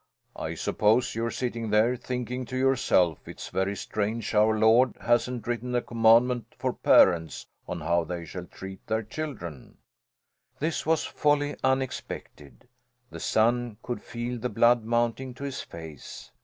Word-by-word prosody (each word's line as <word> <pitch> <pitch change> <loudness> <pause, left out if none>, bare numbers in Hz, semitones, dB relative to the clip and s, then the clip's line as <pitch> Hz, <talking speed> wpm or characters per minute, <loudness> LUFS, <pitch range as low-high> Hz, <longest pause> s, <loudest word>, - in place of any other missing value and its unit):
I - - -4
suppose 110 +4 +2
you're 115 +1 -1
sitting 115 -2 -3
there 110 +4 +3
thinking 125 0 -4
to 130 +2 -5
yourself 125 - +2
it's - - -8
very 95 +1 -1
strange 110 +2 -3
Our 110 +1 +4
Lord 115 +4 +4
hasn't 120 0 0
written 120 +1 -2
a 120 - +2
commandment 115 0 +3
for - - -1
parents 80 -3 +4 0.2
on - - -4
how 85 +2 +1
they 85 0 -5
shall 90 +2 -7
treat 95 0 -10
their 110 +1 0
children?" 110 - -7 0.8
This 155 +1 -2
was 160 -1 +2
wholly 145 -1 +1
unexpected. 130 - -3 0.4
The - - -8
son 120 0 +1
could 120 - -4
feel 120 +1 -5
the 125 - -2
blood 120 0 +4
mounting 120 +2 -1
to 140 - -9
his 140 -2 -4
face. 80 -4 -10
115 Hz, 145 wpm, -27 LUFS, 105-125 Hz, 0.8 s, Our